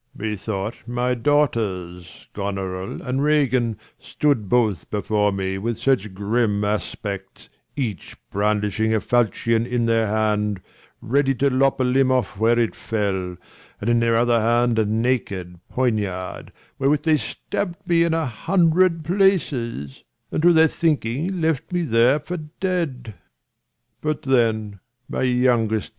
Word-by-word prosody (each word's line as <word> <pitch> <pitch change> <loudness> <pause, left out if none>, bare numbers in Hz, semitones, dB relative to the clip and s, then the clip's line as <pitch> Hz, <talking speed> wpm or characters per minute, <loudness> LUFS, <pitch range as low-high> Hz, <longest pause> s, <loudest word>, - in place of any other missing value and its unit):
50 - - -33
Leir. 110 - -3 0.2
Methought 105 +2 -4
my 125 +1 0
daughters, 110 - -1
Gonorill 95 -2 -4
and 130 +1 0
Ragan, 135 -6 +2 0.2
Stood 130 -10 0
both 110 -5 +1
before 105 0 +1
me 95 -1 -2
with 115 +2 -2
such 110 -8 0
grim 105 +1 0
aspects, 100 -2 -4 0.3
Each 115 - -4
brandishing 105 +1 0
a - - +2
falchion 115 0 +1
in 120 -1 0
their 115 -1 +2
hand, 105 -1 0 0.4
Ready 135 +2 +1
to 140 +2 +1
lop 135 +1 +2
a - - +2
limb 130 +1 +3
off 120 -6 0
where 115 +2 +3
it 115 -2 +1
fell, 95 -5 -2 0.4
And 115 +3 0
in 120 - +3
their 115 0 +2
other 120 0 +3
hand 120 0 +2
a 110 - +2
naked 105 -6 -1
poniard, 105 -7 -2
55 - - -19 0.3
Wherewith 145 +2 +2
they 160 -2 +3
stabb'd 175 - -5
me 170 -1 +4
in 165 -1 +1
a 165 -1 0
hundred 165 - +2
places, 145 - 0 0.3
And - - -1
to 175 +2 +6
their 160 -1 +6
thinking 155 +3 -1
left 160 -3 -1
me 175 -1 0
there 125 +1 +3
for 180 +4 -5 0.2
dead: 155 - -2 0.9
Sc. 120 -2 0
120 Hz, 135 wpm, -22 LUFS, 105-135 Hz, 0.9 s, to